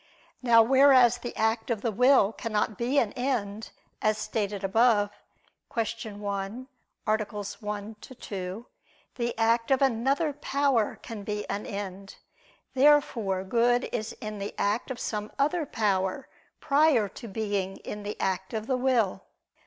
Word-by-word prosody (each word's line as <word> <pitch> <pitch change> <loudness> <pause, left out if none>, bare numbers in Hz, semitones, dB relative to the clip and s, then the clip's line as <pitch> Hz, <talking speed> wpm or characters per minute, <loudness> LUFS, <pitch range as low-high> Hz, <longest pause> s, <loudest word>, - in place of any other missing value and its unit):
Now 235 -2 +6
whereas 255 -1 +6
the 240 0 -6
act 220 +2 0
of 225 -4 -1
the 230 - +1
will 250 -1 +4
cannot 215 -2 -1
be 245 +7 -1
an 225 -7 +2
end, 225 -5 -2 0.3
as 215 0 +2
stated 205 -2 -3
above 205 0 +3 0.6
(Q. 225 -1 -3
1, 205 +4 -4 0.4
A. 215 0 +1
1, 210 0 -6
ad 260 - -14
2), 190 +3 -5 0.5
the 240 -2 -3
act 230 +1 +2
of 270 -1 +4
another 275 +4 +1
power 275 -5 0
can 225 -3 -7
be 210 0 -4
an 205 - -4
end. 195 -1 -6 0.6
Therefore 255 -9 +3
good 240 +5 +2
is 225 -1 -3
in 215 -3 -7
the 200 - -5
act 210 +6 0
of 255 -2 -5
some 210 -3 -3
other 300 +3 +1
power 200 +1 0 0.3
prior 285 -7 +3
to 235 +4 -10
being 200 -2 -2
in 210 - -7
the 205 +1 -6
act 190 +2 -2
of 215 0 -3
the 260 +1 0
will. 240 -7 +1
225 Hz, 145 wpm, -27 LUFS, 205-250 Hz, 0.6 s, Now